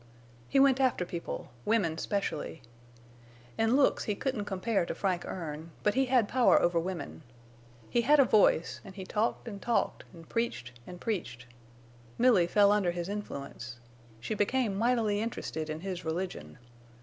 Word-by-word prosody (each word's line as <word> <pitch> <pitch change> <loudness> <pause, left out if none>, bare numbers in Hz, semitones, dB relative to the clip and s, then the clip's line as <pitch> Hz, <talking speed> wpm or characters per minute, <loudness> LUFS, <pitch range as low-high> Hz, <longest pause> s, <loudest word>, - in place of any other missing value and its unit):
He 275 - +3
went 270 -1 +5
after 255 -9 +2
people, 170 -1 -6
women 205 -8 +1
specially. 165 -7 -3 0.9
In 225 +2 +2
looks 280 - +3
he 210 - -1
couldn't 250 -3 -2
compare 195 +1 0
to - - -4
Frank 185 -3 -1
Erne, 160 -2 -6
but 210 - +3
he 265 +1 +2
had 250 -4 +3
power 250 +1 +4
over 175 -1 +2
women. 165 - -5 0.7
He 240 - +1
had 295 +5 +5
a 275 - +7
voice, 205 -7 +3
an' 195 - -11
he 190 -1 -7
talked 220 +5 -1
an' 205 -3 -6
talked 235 +4 0
an' 170 -2 -13
preached 195 - -3 0.2
an' 180 - -8
preached. 145 - -4 0.7
Milly 230 -8 +5
fell 200 +2 +5
under 205 -4 +2
his 175 +1 -3
influence. 140 -11 -6 0.4
She 115 - -3
became 215 +1 +1
mightily 220 -2 +1
interested 160 -8 -4
in 155 +1 -4
his 185 -2 -5
religion. 160 - -4
200 Hz, 160 wpm, -30 LUFS, 170-230 Hz, 0.9 s, a